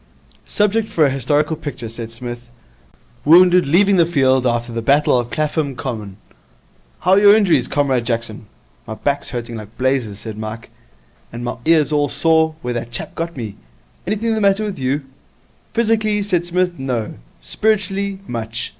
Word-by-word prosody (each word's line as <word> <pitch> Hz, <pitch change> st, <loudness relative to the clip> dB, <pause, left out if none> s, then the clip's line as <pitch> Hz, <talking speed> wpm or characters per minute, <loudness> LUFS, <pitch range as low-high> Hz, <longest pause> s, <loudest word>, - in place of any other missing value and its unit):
'Subject 210 Hz, +2 st, +1 dB
for 165 Hz, -7 st, +3 dB
a 140 Hz, -, +2 dB
historical 145 Hz, +4 st, 0 dB
picture,' 135 Hz, -6 st, -6 dB
said 115 Hz, 0 st, -7 dB
Psmith. 120 Hz, 0 st, -7 dB, 0.7 s
'Wounded 180 Hz, +2 st, +6 dB
leaving 195 Hz, +6 st, +4 dB
the 170 Hz, -, +5 dB
field 130 Hz, -5 st, +2 dB
after 120 Hz, 0 st, -1 dB
the 115 Hz, 0 st, -3 dB
Battle 140 Hz, +1 st, +3 dB
of 120 Hz, -1 st, -4 dB
Clapham 150 Hz, -2 st, -1 dB
Common. 110 Hz, -7 st, -6 dB, 0.8 s
How 180 Hz, -, +1 dB
are 190 Hz, -, +6 dB
your 205 Hz, 0 st, +7 dB
injuries, 175 Hz, -, +3 dB
Comrade 135 Hz, -4 st, +1 dB
Jackson?' 115 Hz, -3 st, -3 dB, 0.4 s
'My 110 Hz, -, -5 dB
back's 140 Hz, +4 st, -2 dB
hurting 120 Hz, -1 st, -5 dB
like 110 Hz, 0 st, -11 dB
blazes,' 130 Hz, -6 st, 0 dB
said 110 Hz, 0 st, -8 dB
Mike. 110 Hz, +1 st, -7 dB, 0.6 s
'And 120 Hz, +1 st, -7 dB
my 120 Hz, -, -4 dB
ear's 155 Hz, -2 st, +3 dB
all 145 Hz, -1 st, +1 dB
sore 160 Hz, +1 st, +2 dB
where 125 Hz, 0 st, -2 dB
that 120 Hz, 0 st, -4 dB
chap 120 Hz, -, -5 dB
got 165 Hz, -1 st, -5 dB
me. 110 Hz, -5 st, -6 dB, 0.5 s
Anything 220 Hz, +3 st, 0 dB
the 220 Hz, -, -1 dB
matter 200 Hz, +1 st, +3 dB
with 205 Hz, -7 st, -4 dB
you?' 135 Hz, +3 st, -1 dB, 0.7 s
'Physically,' 215 Hz, -2 st, +1 dB
said 175 Hz, -4 st, -1 dB
Psmith, 180 Hz, -2 st, 0 dB
'no. 125 Hz, -5 st, -3 dB, 0.3 s
Spiritually 200 Hz, -, -1 dB
much. 115 Hz, -, -4 dB
140 Hz, 165 wpm, -19 LUFS, 120-180 Hz, 0.8 s, your